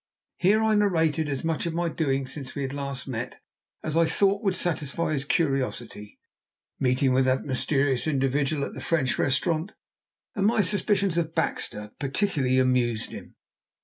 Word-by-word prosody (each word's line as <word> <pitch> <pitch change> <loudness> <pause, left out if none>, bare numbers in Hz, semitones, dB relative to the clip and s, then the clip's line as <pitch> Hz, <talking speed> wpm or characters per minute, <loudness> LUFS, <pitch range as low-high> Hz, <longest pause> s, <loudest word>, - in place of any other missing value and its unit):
Here 210 +4 +3
I 220 0 +3
narrated 160 -7 +2
as 140 -2 -3
much 165 +1 -1
of 165 - -3
my 175 0 0
doings 135 -5 -1
since 135 -3 -8
we 140 - -2
had 135 0 -4
last 140 -1 -4
met, 125 -1 -5 0.4
as 155 -1 -2
I 165 0 +4
thought 200 +2 +2
would 195 -4 +1
satisfy 160 -2 -1
his 140 -1 -2
curiosity. 130 - -1 0.6
My 130 - +2
meeting 130 +1 +2
with 130 0 +3
that 130 0 +1
mysterious 135 0 +1
individual 140 0 0
at - - -8
the - - -8
French 140 -7 0
restaurant 160 +7 +1 0.6
and 200 -4 +1
my 220 -1 +3
suspicions 200 -3 +1
of 160 -1 -3
Baxter 105 -9 -2
particularly 140 -3 +1
amused 125 -3 +1
him. - - -10
145 Hz, 165 wpm, -26 LUFS, 130-170 Hz, 0.6 s, I